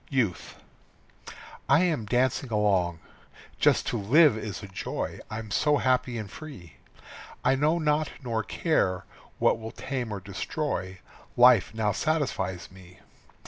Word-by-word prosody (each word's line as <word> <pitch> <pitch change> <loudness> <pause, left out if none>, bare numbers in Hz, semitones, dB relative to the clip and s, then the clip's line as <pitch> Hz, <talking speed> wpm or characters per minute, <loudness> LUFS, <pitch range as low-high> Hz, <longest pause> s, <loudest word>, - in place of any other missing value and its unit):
YOUTH. 115 -11 -1 1.1
I 165 - +5
am 155 -12 0
dancing 130 +3 +1
along. 95 -6 +1 0.6
Just - - +3
to - - -2
live 140 +6 +5
is 110 -1 -6
a - - -7
joy, 95 - -4
I'm 110 -1 -6
so 150 +6 +3
happy 125 -2 +1
and 110 -2 -5
free. 95 - -11 0.7
I 130 - +5
know 150 +5 +2
not 155 -1 +1
nor 115 -3 -1
care 95 - 0 0.3
what - - +2
will 110 0 -6
tame 125 -2 -4
or 105 - -4
destroy, 95 - -4 0.4
Life 120 -4 +6
now 110 -2 +1
satisfies 140 - -2
me. 95 0 -16
115 Hz, 135 wpm, -27 LUFS, 100-140 Hz, 1.1 s, Life